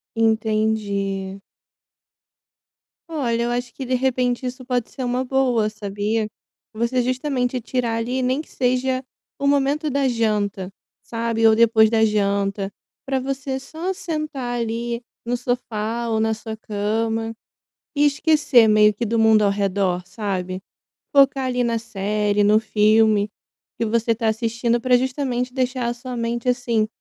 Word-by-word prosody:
Entendi. 215 -3 0 1.7
Olha, 240 -7 -1
eu 240 - -1
acho 245 0 -3
que 270 - -6
de 255 - -2
repente 250 -1 0
isso 250 +1 -5
pode 245 -2 -1
ser 260 - -6
uma 250 +1 0
boa, 250 -5 +2
sabia. 210 +1 -2 0.5
Você 235 +3 0
justamente 255 0 -1
tirar 240 -1 -1
ali, 245 +3 -1
nem 255 +3 0
que - - -17
seja 255 +1 0 0.4
o 280 - -2
momento 285 +2 +2
da 280 -1 +1
janta, 210 -5 -1 0.3
sabe, 230 -1 -1
ou 220 - +6
depois 220 -1 +5
da 220 0 +3
janta 200 -1 0 0.3
para 270 -1 0
você 265 0 -3
só 320 +7 -4
sentar 305 -9 -3
ali 235 +1 -3 0.2
no 240 +1 0
sofá 235 -2 -2
ou 220 -1 +1
na 220 0 +2
sua 220 0 -6
cama 225 +2 -2 0.6
e 290 +1 +4
esquecer, 290 -5 +4
meio 210 0 +5
que, 235 +3 -3
do 230 +1 0
mundo 220 -1 +5
ao 200 - +4
redor, 195 -2 0
sabe. 185 -2 -4 0.5
Focar 275 -1 +5
ali 250 -1 0
na 235 -1 0
série 210 -1 0
no 210 +1 +5
filme 215 -1 +3 0.5
que 230 - 0
você 230 +1 +1
tá 225 0 0
assistindo, 230 +2 0
para 250 +1 +4
justamente 255 -1 -2
deixar 255 -2 -1
a 240 - 0
sua 245 +1 -7
mente, 235 +1 -2
assim, 240 -3 +1
235 Hz, 145 wpm, -22 LUFS, 215-255 Hz, 1.7 s, ou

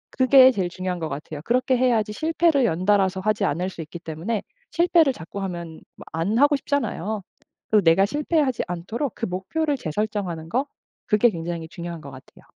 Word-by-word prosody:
그게 260 0 +7
제일 185 -6 -1
중요한 185 -1 -4
것 160 -1 -3
같아요. 150 +1 -6
그렇게 255 +2 +2
해야지 230 -4 +1
실패를 315 -2 +2
연달아서 190 +1 +2
하지 215 +1 +1
않을 175 +6 -1
수 165 - -8
있기 160 +2 -8
때문에 170 +7 -4 0.3
실패를 335 -5 +4
자꾸 175 +3 -8
하면 170 -3 -6 0.2
뭐 - - -11
안 180 +8 0
하고 290 +1 +5
싶잖아요. 220 - -2 0.5
그 210 -1 +5
내가 165 +4 +5
실패하지 290 0 0
않도록 190 - -4
그 230 - -3
목표를 285 - -1
재설정하는 180 -3 -3
거 265 +7 0 0.4
그게 215 +3 +4
굉장히 165 -1 -5
중요한 170 -1 -7
것 140 - -10
같아요. 130 0 -15
200 Hz, 385 characters per minute, -23 LUFS, 170-255 Hz, 0.5 s, 그게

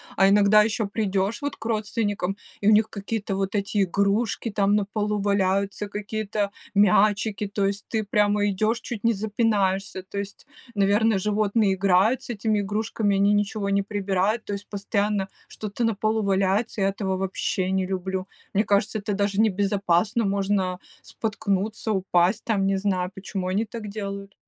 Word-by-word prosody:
А 195 - +5
иногда 205 +1 +6
еще 220 -1 -1
придешь 200 +1 -1
вот 285 - -2
к 220 - -11
родственникам, 210 -3 -1 0.2
и 205 - -1
у - - +7
них 215 +1 +4
какие-то 205 -1 -3
вот 195 0 -2
эти 205 0 +1
игрушки 200 +5 0
там 205 -1 +1
на 210 -1 +1
полу 210 +1 -2
валяются, 200 0 0
какие-то 210 0 -3 0.2
мячики. 205 +1 +3
То 200 0 -1
есть 200 +1 -3
ты 220 -2 -1
прямо 205 0 +2
идешь, 215 +5 0
чуть 220 -4 -6
не 230 0 +3
запинаешься, 205 -2 0
то 195 +2 -9
есть, 200 +6 -6 0.3
наверно, 205 +1 +3
животные 210 0 +1
играют 195 +6 +3
с - - -11
этими 215 -1 0
игрушками. 205 0 -1
Они 200 +1 +3
ничего 205 0 0
не 200 0 +2
прибирают. 200 +1 0
То 205 - -4
есть 200 0 -6
постоянно 200 0 -1 0.2
что-то 215 +2 -5
на 225 -1 +2
полу 215 +1 0
валяется, 195 +2 +1
я 195 - +3
этого 195 -1 -2
вообще 190 0 -1
не 190 0 +1
люблю. 190 0 -3 0.3
Мне 205 +1 +3
кажется, 205 +1 +1
это 205 +1 -3
даже 200 0 0
небезопасно, 200 0 +2
можно 195 -2 0 0.2
споткнуться, 215 0 -2
упасть, 185 -1 +2
там, 205 -4 0
не 195 0 +1
знаю. 190 -2 -1
Почему 190 0 -5
они 205 +4 0
так 225 -1 -7
делают? 200 -1 -6
200 Hz, 165 wpm, -24 LUFS, 195-215 Hz, 0.3 s, у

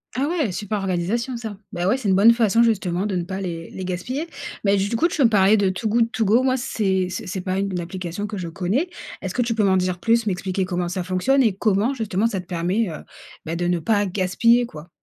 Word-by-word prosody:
Ah 275 +3 0
ouais. 305 - 0
Super 205 +3 -3
organisation, 195 +7 -1
ça. 220 -4 -6 0.2
Ben 175 +1 -1
ouais, 230 - +3
c'est 225 -7 -2
une 190 - +4
bonne 225 +4 +7
façon 230 0 +3
justement 195 -4 0
de 195 -3 -2
ne 175 - -1
pas 190 +2 -5
les 165 -3 -5
les 190 - -6
gaspiller. 250 - -3 0.4
Beh, 200 -1 +3
du 200 +4 0
coup, 335 - +3
tu 340 - -5
veux 275 - +4
me 230 - +5
parlais, 205 0 +5
de 200 -1 +2
Too 185 +4 -3
Good 230 +1 +2
To 225 - +1
Go. 230 +6 +4
Moi 260 0 +2
c'est 195 -7 0
c'est 185 - -5
c'est 185 0 -4
pas 185 +1 -2
une 195 -3 -2
application 180 +2 -5
que 205 -1 -5
je 180 - -4
connais. 190 - -1 0.3
Est-ce - - -4
que 250 - +2
tu 235 -1 0
peux 215 - +2
m'en 190 -1 +4
dire 180 -1 -1
plus, 230 +3 +2
m'expliquer 190 0 -1
comment 180 -1 -2
ça 180 0 -3
fonctionne 185 +10 +2
et 215 -4 +3
comment, 215 +5 +1
justement, 220 -4 -1
ça 195 -4 -2
te 180 - -18
permet, 180 +4 -1
heu, 155 - -7 0.4
bah, 165 +1 -3
de 175 +1 -2
ne 175 -1 +1
pas 205 +5 +1
gaspiller, 205 +6 +2
quoi? 160 -6 -11
195 Hz, 255 wpm, -22 LUFS, 180-230 Hz, 0.4 s, bonne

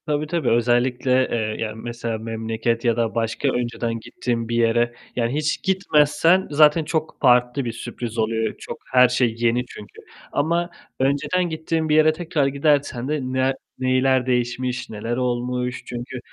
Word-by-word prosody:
Tabii, 150 -1 -1
tabii 160 -5 0
özellikle, 125 +2 +2
eee, 110 -2 -1
yani 110 0 -6
mesela 115 -1 -4
memleket 115 +1 -2
ya 115 -1 +2
da 115 -1 -1
başka 115 +4 -1
önceden 120 -2 -2
gittiğin 115 0 -3
bir 115 - -1
yere 120 +1 +2 0.2
yani 120 0 0
hiç 155 0 -1
gitmezsen 180 -1 +3
zaten 150 +2 +5
çok 160 0 -2
farklı 125 +2 +3
bir 115 - -2
sürpriz 115 0 -6
oluyor. 110 0 0
Çok, - - -7
her 125 0 +7
şey 125 -2 +1
yeni 120 +1 +1
çünkü 105 -4 -12 0.3
ama 170 +4 0 0.3
önceden 145 +7 +1
gittiğin 160 0 -2
bir 150 - +3
yere 155 0 +5
tekrar 155 -4 -1
gidersen 140 -3 +1
de 150 +1 -1
ne 130 +1 0 0.3
neler 130 0 +2
değişmiş, 125 0 -1
neler 115 +2 -4
olmuş 125 0 -2
çünkü 125 +1 -6
125 Hz, 155 wpm, -22 LUFS, 115-145 Hz, 0.3 s, her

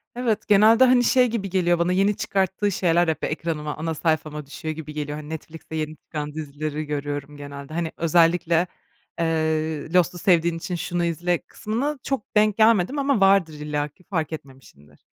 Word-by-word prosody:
Evet, 230 -4 -1
genelde, 220 +4 +6
hani, 250 -1 +5
şey 250 +1 +4
gibi 215 -4 -3
geliyor 175 -2 +2
bana, 170 +1 +1
yeni 195 +2 +2
çıkarttığı 195 +1 0
şeyler 175 -2 +2
hep 160 -2 -2
ekranıma, 150 -2 -3
ana 160 +1 -2
sayfama 155 -1 -1
düşüyor 150 +3 -6
gibi 155 -1 -8
geliyor. 150 0 -4
Hani, 150 -1 -9
Netflix'te 160 0 -8
yeni 155 0 -3
çıkan 150 -1 -6
dizileri 155 0 -4
görüyorum 145 0 -4
genelde. 140 +1 -9
Hani, 165 -1 -2
özellikle, 170 +1 +3 0.5
eee, 160 -1 -1
"Lost'u 180 0 +3
sevdiğin 170 -2 +2
için 175 +2 -4
şunu 175 +1 -2
izle." 170 +1 0
kısmına 260 +7 -3
çok 265 -5 -4
denk 210 -1 +3
gelmedim 225 +4 +4
ama 275 -4 +2
vardır 195 -4 +4
illaki 150 +2 -4
fark 160 -4 -3
etmemişimdir. 130 - -12
165 Hz, 165 wpm, -23 LUFS, 150-195 Hz, 0.5 s, genelde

